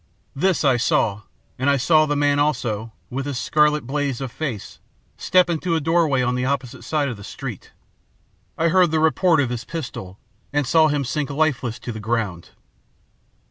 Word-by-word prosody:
This 185 Hz, +5 st, +1 dB
I 135 Hz, -4 st, +4 dB
saw, 105 Hz, -3 st, +1 dB, 0.4 s
and 130 Hz, +2 st, +2 dB
I 140 Hz, -, +3 dB
saw 155 Hz, +3 st, +4 dB
the 145 Hz, -, 0 dB
man 145 Hz, 0 st, +2 dB
also, 115 Hz, -7 st, -1 dB, 0.2 s
with 135 Hz, +2 st, -3 dB
his 140 Hz, -3 st, -3 dB
scarlet 150 Hz, 0 st, +2 dB
blaze 140 Hz, -1 st, -2 dB
of 135 Hz, -3 st, -5 dB
face, 130 Hz, -10 st, -5 dB, 0.4 s
step 180 Hz, -1 st, +3 dB
into 170 Hz, 0 st, -1 dB
a -, -, +2 dB
doorway 160 Hz, -4 st, +2 dB
on 125 Hz, 0 st, 0 dB
the 125 Hz, 0 st, -1 dB
opposite 130 Hz, -2 st, -3 dB
side 150 Hz, -2 st, 0 dB
of 120 Hz, -5 st, -4 dB
the 100 Hz, -, -11 dB
street. -, -, -8 dB, 0.9 s
I 165 Hz, +1 st, +2 dB
heard 180 Hz, 0 st, +4 dB
the 160 Hz, 0 st, +1 dB
report 160 Hz, +2 st, +3 dB
of 135 Hz, -4 st, +1 dB
his 120 Hz, 0 st, -4 dB
pistol, 120 Hz, -, -7 dB, 0.3 s
and 145 Hz, -1 st, 0 dB
saw 160 Hz, +5 st, +4 dB
him 145 Hz, -2 st, 0 dB
sink 145 Hz, +2 st, -2 dB
lifeless 140 Hz, -6 st, 0 dB
to 120 Hz, -, -5 dB
the 110 Hz, -, -6 dB
ground. 105 Hz, -6 st, -2 dB
140 Hz, 180 wpm, -22 LUFS, 125-155 Hz, 0.9 s, I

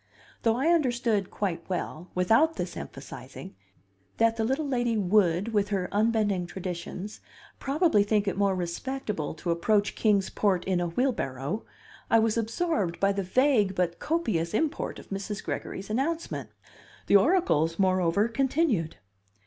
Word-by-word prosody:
Though 225 Hz, -1 st, +2 dB
I 270 Hz, +7 st, +1 dB
understood 240 Hz, -, +1 dB
quite 180 Hz, -5 st, -2 dB
well, 180 Hz, -1 st, -4 dB
without 225 Hz, -, +3 dB
this -, -, -4 dB
emphasizing, -, -, -9 dB, 0.6 s
that 230 Hz, 0 st, +3 dB
the 225 Hz, -, -1 dB
little 270 Hz, +6 st, 0 dB
lady 240 Hz, -4 st, 0 dB
would, 190 Hz, -1 st, +2 dB
with 205 Hz, -1 st, +1 dB
her 190 Hz, -3 st, -1 dB
unbending 205 Hz, -4 st, +1 dB
traditions, 185 Hz, +2 st, -6 dB, 0.4 s
probably 280 Hz, -, +3 dB
think 205 Hz, 0 st, +1 dB
it 195 Hz, -, 0 dB
more 200 Hz, -1 st, +2 dB
respectable 185 Hz, -, -3 dB
to 170 Hz, +2 st, -2 dB
approach 205 Hz, +4 st, +1 dB
Kings 200 Hz, -3 st, +2 dB
Port 190 Hz, -4 st, +1 dB
in 185 Hz, -2 st, +1 dB
a 175 Hz, -, 0 dB
wheelbarrow, 170 Hz, -, -2 dB, 0.4 s
I 230 Hz, -, +5 dB
was 225 Hz, -1 st, +2 dB
absorbed 225 Hz, -, -1 dB
by 195 Hz, 0 st, +3 dB
the 200 Hz, 0 st, -1 dB
vague 210 Hz, -1 st, +2 dB
but 175 Hz, -2 st, -1 dB
copious 215 Hz, -, -1 dB
import 315 Hz, +5 st, -1 dB
of -, -, -13 dB
Mrs. 200 Hz, +1 st, -4 dB
Gregory's 195 Hz, +2 st, -5 dB
announcement. 320 Hz, +8 st, -2 dB, 0.6 s
The 200 Hz, -, +6 dB
oracles, 190 Hz, -, +2 dB
moreover, 185 Hz, +1 st, +2 dB
continued. 260 Hz, -, 0 dB
205 Hz, 140 wpm, -27 LUFS, 180-240 Hz, 0.6 s, The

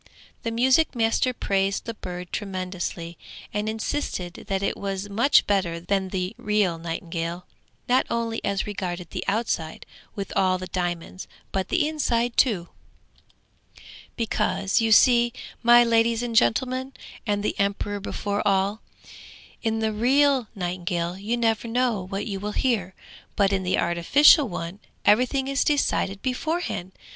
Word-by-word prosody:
The 230 Hz, -, -2 dB
music 260 Hz, +6 st, +3 dB
master 225 Hz, +2 st, +2 dB
praised 195 Hz, -4 st, -1 dB
the 230 Hz, -, -4 dB
bird 180 Hz, -4 st, -7 dB
tremendously, 185 Hz, -4 st, -4 dB, 0.3 s
and 210 Hz, +1 st, -1 dB
insisted 220 Hz, -6 st, -4 dB
that 195 Hz, 0 st, -1 dB
it -, -, 0 dB
was 195 Hz, 0 st, -4 dB
much 235 Hz, +8 st, +4 dB
better 185 Hz, -5 st, 0 dB
than 190 Hz, +2 st, -1 dB
the 185 Hz, -1 st, -2 dB
real 205 Hz, -5 st, +1 dB
nightingale, 170 Hz, +1 st, -4 dB, 0.4 s
not 255 Hz, +1 st, +3 dB
only 230 Hz, -1 st, -2 dB
as 200 Hz, -1 st, -1 dB
regarded 180 Hz, -4 st, -5 dB
the -, -, -4 dB
outside 195 Hz, -7 st, -2 dB, 0.3 s
with 200 Hz, -1 st, -5 dB
all 185 Hz, -1 st, +3 dB
the 185 Hz, -, -6 dB
diamonds, 175 Hz, 0 st, -4 dB, 0.2 s
but 190 Hz, -1 st, -2 dB
the 320 Hz, -4 st, +2 dB
inside 245 Hz, -6 st, 0 dB
too. 195 Hz, -9 st, +2 dB, 1.5 s
'Because 215 Hz, -3 st, 0 dB
you 225 Hz, -1 st, +1 dB
see, 240 Hz, +1 st, +6 dB, 0.3 s
my 240 Hz, 0 st, +7 dB
ladies 230 Hz, 0 st, +2 dB
and 235 Hz, -1 st, -3 dB
gentlemen, 255 Hz, +3 st, +1 dB, 0.3 s
and 205 Hz, -1 st, 0 dB
the -, -, 0 dB
emperor 200 Hz, +1 st, -1 dB
before 205 Hz, +1 st, -3 dB
all, 200 Hz, +1 st, +1 dB, 0.8 s
in 225 Hz, 0 st, -1 dB
the 220 Hz, -1 st, 0 dB
real 265 Hz, +2 st, +3 dB
nightingale 175 Hz, -2 st, -2 dB
you 210 Hz, +5 st, -2 dB
never 225 Hz, -1 st, +1 dB
know 240 Hz, -3 st, +1 dB
what 195 Hz, +1 st, -3 dB
you 195 Hz, -2 st, -4 dB
will 210 Hz, +1 st, -4 dB
hear, 205 Hz, -8 st, 0 dB, 0.4 s
but 200 Hz, -1 st, +2 dB
in 190 Hz, -, +1 dB
the 185 Hz, 0 st, 0 dB
artificial 265 Hz, -, +5 dB
one 175 Hz, +2 st, -5 dB, 0.3 s
everything 250 Hz, +5 st, +3 dB
is 275 Hz, 0 st, +1 dB
decided 200 Hz, -9 st, 0 dB
beforehand! 260 Hz, -, -2 dB
205 Hz, 140 wpm, -25 LUFS, 185-235 Hz, 1.5 s, my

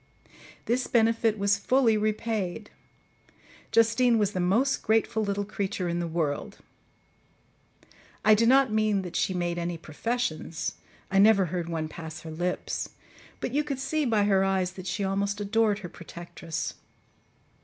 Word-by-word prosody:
This 245 Hz, +2 st, 0 dB
benefit 225 Hz, -1 st, +2 dB
was 200 Hz, 0 st, +2 dB
fully 245 Hz, +1 st, +3 dB
repaid; 215 Hz, -2 st, -2 dB, 1.0 s
Justine 230 Hz, +1 st, +4 dB
was 205 Hz, -2 st, +1 dB
the 185 Hz, -, -3 dB
most 225 Hz, +10 st, +2 dB
grateful 220 Hz, 0 st, +1 dB
little 200 Hz, 0 st, -1 dB
creature 200 Hz, -2 st, -3 dB
in 170 Hz, 0 st, -1 dB
the 170 Hz, -, -2 dB
world: 160 Hz, -3 st, -2 dB, 1.7 s
I 215 Hz, -, +8 dB
do 230 Hz, +2 st, +4 dB
not 260 Hz, -2 st, +5 dB
mean 215 Hz, -2 st, +2 dB
that 180 Hz, -, -7 dB
she 190 Hz, -, 0 dB
made 175 Hz, -1 st, -1 dB
any 170 Hz, 0 st, -3 dB
professions 165 Hz, 0 st, -3 dB, 0.4 s
I 195 Hz, -, +3 dB
never 200 Hz, -2 st, +6 dB
heard 175 Hz, -2 st, -2 dB
one 160 Hz, -2 st, -2 dB
pass 160 Hz, 0 st, -8 dB
her 160 Hz, -, -8 dB
lips, 175 Hz, +3 st, -3 dB, 0.5 s
but 250 Hz, -, -4 dB
you 295 Hz, +2 st, +2 dB
could 285 Hz, -3 st, -3 dB
see 300 Hz, +4 st, -1 dB
by 225 Hz, -6 st, +2 dB
her 195 Hz, -2 st, +3 dB
eyes 190 Hz, -1 st, +1 dB
that 185 Hz, 0 st, -9 dB
she 195 Hz, +2 st, -2 dB
almost 200 Hz, +1 st, -1 dB
adored 210 Hz, 0 st, +2 dB
her -, -, -6 dB
protectress. 170 Hz, -1 st, -6 dB
200 Hz, 150 wpm, -27 LUFS, 175-225 Hz, 1.7 s, I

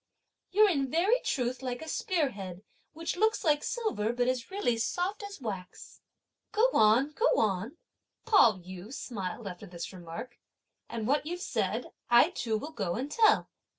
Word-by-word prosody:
you're, 425 Hz, +2 st, +5 dB
in 280 Hz, -8 st, +1 dB
very 375 Hz, -, +3 dB
truth, 250 Hz, -1 st, -1 dB
like 250 Hz, -2 st, -3 dB
a 320 Hz, -, -8 dB
spear 325 Hz, -5 st, 0 dB
head, 190 Hz, -2 st, -8 dB, 0.3 s
(which 330 Hz, +1 st, -3 dB
looks) 440 Hz, +3 st, +2 dB
like 295 Hz, -2 st, +3 dB
silver, 425 Hz, -, -1 dB
(but 245 Hz, +1 st, 0 dB
is 255 Hz, -2 st, -1 dB
really 380 Hz, -, 0 dB
soft 355 Hz, -, -1 dB
as) 405 Hz, -2 st, -8 dB
wax!" 195 Hz, -7 st, -7 dB, 0.5 s
"Go 445 Hz, +4 st, +3 dB
on, 225 Hz, +7 st, +5 dB
go 450 Hz, +11 st, +1 dB
on!" 215 Hz, -, 0 dB, 0.5 s
Pao 400 Hz, -, +6 dB
yü 185 Hz, +3 st, -10 dB
smiled 215 Hz, -5 st, -5 dB
after 185 Hz, +2 st, -8 dB
this 175 Hz, +1 st, -7 dB
remark; 180 Hz, +7 st, -8 dB, 0.5 s
"and 225 Hz, -2 st, -4 dB
what 290 Hz, +5 st, +1 dB
you've 350 Hz, +2 st, -3 dB
said, 360 Hz, -, -2 dB, 0.2 s
I 240 Hz, +8 st, +6 dB
too 225 Hz, -10 st, -1 dB
will 295 Hz, +9 st, -6 dB
go 190 Hz, -, -2 dB
and 270 Hz, +5 st, -4 dB
tell!" 435 Hz, +2 st, +4 dB
255 Hz, 165 wpm, -30 LUFS, 210-355 Hz, 0.5 s, Pao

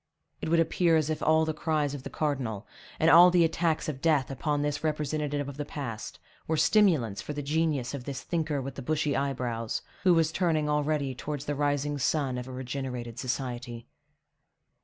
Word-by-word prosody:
It -, -, -3 dB
would 165 Hz, +1 st, +4 dB
appear 165 Hz, +1 st, +3 dB
as 155 Hz, 0 st, 0 dB
if 155 Hz, -, -3 dB
all 160 Hz, 0 st, +4 dB
the 160 Hz, -, -1 dB
cries 150 Hz, -2 st, 0 dB
of 145 Hz, -, -5 dB
the -, -, -7 dB
cardinal, 130 Hz, -9 st, -2 dB, 0.3 s
and 160 Hz, -, +3 dB
all 175 Hz, +2 st, +9 dB
the 175 Hz, -1 st, +4 dB
attacks 165 Hz, 0 st, 0 dB
of 140 Hz, -4 st, -4 dB
death 150 Hz, -5 st, +2 dB
upon 145 Hz, +2 st, -1 dB
this 145 Hz, 0 st, -2 dB
representative 150 Hz, -2 st, -1 dB
of 140 Hz, -1 st, -7 dB
the 145 Hz, -, -2 dB
past, 135 Hz, -7 st, -6 dB, 0.3 s
were 160 Hz, -, 0 dB
stimulants 150 Hz, -, +3 dB
for 150 Hz, -, -5 dB
the 145 Hz, 0 st, -4 dB
genius 150 Hz, -3 st, 0 dB
of 135 Hz, -3 st, -6 dB
this 140 Hz, -2 st, -5 dB
thinker 155 Hz, -5 st, -1 dB
with 135 Hz, +1 st, -5 dB
the 135 Hz, -, -7 dB
bushy 150 Hz, +2 st, 0 dB
eyebrows, 125 Hz, -5 st, -2 dB, 0.2 s
who 180 Hz, -3 st, +5 dB
was 160 Hz, -1 st, +3 dB
turning 160 Hz, -4 st, +1 dB
already 150 Hz, -2 st, 0 dB
towards 145 Hz, +2 st, -5 dB
the 145 Hz, -, -1 dB
rising 145 Hz, 0 st, 0 dB
sun 135 Hz, -2 st, 0 dB
of 125 Hz, -, -7 dB
a -, -, -7 dB
regenerated 125 Hz, -2 st, -5 dB
society. 120 Hz, -2 st, -4 dB
145 Hz, 190 wpm, -28 LUFS, 130-155 Hz, 0.3 s, all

